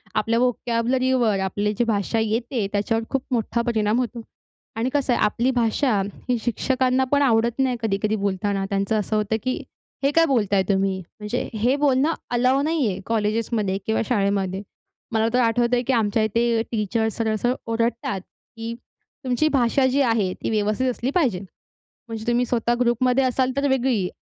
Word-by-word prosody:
आपल्या 230 Hz, +1 st, +1 dB
व्होकॅब्युलरीवर 245 Hz, -2 st, +1 dB
आपली 205 Hz, +2 st, -1 dB
जी 240 Hz, -, +3 dB
भाषा 215 Hz, +1 st, 0 dB
येते 225 Hz, +1 st, -1 dB
त्याच्यावर 225 Hz, +3 st, 0 dB
खूप 270 Hz, -2 st, -1 dB
मोठा 235 Hz, 0 st, 0 dB
परिणाम 225 Hz, -1 st, +1 dB
होतो. 240 Hz, -1 st, -3 dB, 0.5 s
आणि 230 Hz, +3 st, -1 dB
कसं 275 Hz, -3 st, +1 dB
आहे -, -, 0 dB
आपली 235 Hz, +5 st, +1 dB
भाषा 235 Hz, -2 st, +1 dB, 0.3 s
ही 245 Hz, -, +2 dB
शिक्षकांना 255 Hz, +2 st, +1 dB
पण 285 Hz, 0 st, +3 dB
आवडत 235 Hz, -1 st, +2 dB
नाही 255 Hz, -2 st, +1 dB
कधी-कधी 215 Hz, 0 st, 0 dB
बोलताना. 200 Hz, -1 st, -1 dB
त्यांचं 200 Hz, +2 st, 0 dB
असं 210 Hz, +1 st, -2 dB
होतं, 210 Hz, +1 st, 0 dB
की 255 Hz, 0 st, 0 dB, 0.5 s
हे 275 Hz, -, +3 dB
काय 330 Hz, +2 st, +4 dB
बोलताय 205 Hz, -9 st, +2 dB
तुम्ही? 195 Hz, -1 st, +1 dB, 0.2 s
म्हणजे 210 Hz, +4 st, -3 dB
हे 235 Hz, +5 st, +1 dB
बोलणं 285 Hz, +2 st, +2 dB, 0.2 s
अलाऊ 255 Hz, +3 st, +3 dB
नाही 305 Hz, -5 st, +1 dB
आहे, 190 Hz, -1 st, -2 dB
कॉलेजेसमध्ये 215 Hz, -2 st, 0 dB
किंवा 220 Hz, -, +1 dB
शाळेमध्ये. 195 Hz, -4 st, 0 dB, 0.5 s
मला 220 Hz, 0 st, +2 dB
तर 250 Hz, -, +3 dB
आठवतंय 240 Hz, +1 st, +2 dB
की 265 Hz, -, +2 dB
आमच्या 220 Hz, -1 st, +1 dB
इथे 230 Hz, +1 st, +1 dB
टीचर 220 Hz, +1 st, 0 dB
सरळ-सरळ 225 Hz, +2 st, 0 dB, 0.2 s
ओरडतात, 230 Hz, -4 st, -1 dB
की 230 Hz, +3 st, -9 dB, 0.5 s
"तुमची 255 Hz, +4 st, +1 dB
भाषा 260 Hz, 0 st, +3 dB
जी 275 Hz, +2 st, +2 dB
आहे 225 Hz, -7 st, +1 dB
ती -, -, -5 dB
व्यवस्थित 215 Hz, +4 st, 0 dB
असली 250 Hz, +1 st, -2 dB
पाहिजे." 255 Hz, -, +2 dB, 0.7 s
म्हणजे 220 Hz, -1 st, -6 dB
तुम्ही 240 Hz, +1 st, +2 dB
स्वतः 240 Hz, 0 st, +1 dB
ग्रुपमध्ये 250 Hz, +2 st, +2 dB
असाल 255 Hz, 0 st, +1 dB
तर 280 Hz, 0 st, +1 dB
वेगळी, 245 Hz, -8 st, +1 dB
230 Hz, 160 wpm, -23 LUFS, 210-255 Hz, 0.7 s, काय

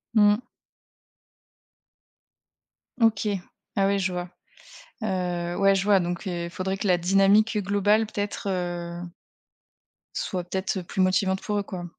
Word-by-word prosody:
Mmh. 210 Hz, +1 st, +5 dB, 2.6 s
OK, 225 Hz, -2 st, +3 dB, 0.5 s
ah, 195 Hz, -1 st, +3 dB
oui, 200 Hz, -, +2 dB
je 185 Hz, -1 st, 0 dB
vois. 180 Hz, 0 st, -4 dB, 0.7 s
Heu, 180 Hz, -3 st, -2 dB
ouais, 195 Hz, 0 st, +4 dB
je 195 Hz, 0 st, 0 dB
vois 205 Hz, -2 st, +5 dB
donc 175 Hz, +2 st, -3 dB
heu, 170 Hz, -1 st, -3 dB
faudrait 190 Hz, +2 st, -2 dB
que 205 Hz, -, -3 dB
la 180 Hz, -2 st, +4 dB
dynamique 195 Hz, +4 st, +4 dB
globale, 205 Hz, +2 st, +2 dB
peut-être, 205 Hz, -1 st, -4 dB
heu 175 Hz, -2 st, -3 dB, 1.1 s
soit 180 Hz, -2 st, -2 dB
peut-être, 190 Hz, +2 st, -1 dB
heu, 185 Hz, -, -3 dB
plus 185 Hz, +2 st, -2 dB
motivante 190 Hz, +1 st, +2 dB
pour 210 Hz, -1 st, -2 dB
eux, 205 Hz, -, 0 dB
quoi? 185 Hz, -3 st, -6 dB
190 Hz, 135 wpm, -26 LUFS, 180-205 Hz, 2.6 s, Mmh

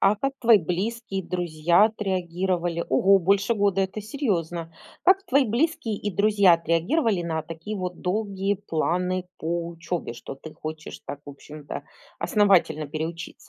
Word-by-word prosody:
А 200 Hz, +2 st, +4 dB
как 275 Hz, +5 st, -1 dB
твои 230 Hz, -3 st, +6 dB
близкие 195 Hz, +4 st, -2 dB
и -, -, -9 dB
друзья 175 Hz, +1 st, +2 dB
отреагировали? 180 Hz, -4 st, -1 dB
Ого, 195 Hz, +9 st, +5 dB
больше 200 Hz, +5 st, +2 dB
года- 200 Hz, -2 st, +2 dB
это 195 Hz, +2 st, -2 dB
серьёзно. 175 Hz, -, -2 dB, 0.3 s
Как 385 Hz, +1 st, +4 dB
твои 280 Hz, -6 st, +3 dB
близкие 250 Hz, 0 st, 0 dB
и 205 Hz, -, -3 dB
друзья 200 Hz, -2 st, +5 dB
отреагировали 175 Hz, -, +1 dB
на 160 Hz, -1 st, -2 dB
такие 165 Hz, +6 st, -7 dB
вот 180 Hz, -2 st, -5 dB
долгие 200 Hz, 0 st, -1 dB
планы 180 Hz, +3 st, 0 dB
по 170 Hz, +1 st, -2 dB
учёбе, 170 Hz, -4 st, -4 dB
что 120 Hz, -, -8 dB
ты 155 Hz, +3 st, -11 dB
хочешь 155 Hz, 0 st, -7 dB
так, 145 Hz, 0 st, -6 dB
в 145 Hz, -, -8 dB
общем-то, 145 Hz, +1 st, -9 dB, 0.3 s
основательно 180 Hz, -7 st, +3 dB
переучиться? 165 Hz, +4 st, -5 dB
185 Hz, 145 wpm, -25 LUFS, 165-210 Hz, 0.3 s, твои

